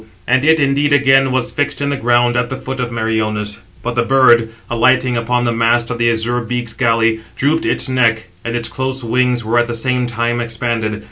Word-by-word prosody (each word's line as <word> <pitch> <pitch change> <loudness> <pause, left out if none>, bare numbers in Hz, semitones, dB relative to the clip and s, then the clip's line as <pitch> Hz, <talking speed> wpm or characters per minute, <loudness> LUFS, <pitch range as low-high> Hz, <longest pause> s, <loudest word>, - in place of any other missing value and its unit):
And 130 +2 +2
it 160 +1 +4
indeed 140 +1 +1
again 135 -1 +4
was 130 -1 -1
fixed 145 -1 -2
in 140 0 -1
the 140 - -1
ground 120 -1 +2
at 120 0 0
the 130 - -4
foot 130 0 -6
of 120 -1 -3
Meriones: 110 -2 -2 0.2
but 125 - -2
the 120 - +1
bird, 120 -2 +4 0.2
alighting 125 +1 +2
upon 120 +1 0
the 120 - +1
mast 115 +1 +1
of 115 - -4
the 115 0 +3
azure 115 +2 -1
beaked 120 0 -5
galley, 115 -2 +2 0.2
drooped 155 +4 0
its - - 0
neck, 115 -4 +1 0.2
and 115 0 -3
its 120 -1 -1
close 130 +3 -4
wings 125 0 0
were 115 +2 +2
at 120 - +1
the 120 - -4
same 125 +1 0
time 120 0 -1
expanded. 115 -2 -2
120 Hz, 210 wpm, -16 LUFS, 115-130 Hz, 0.2 s, it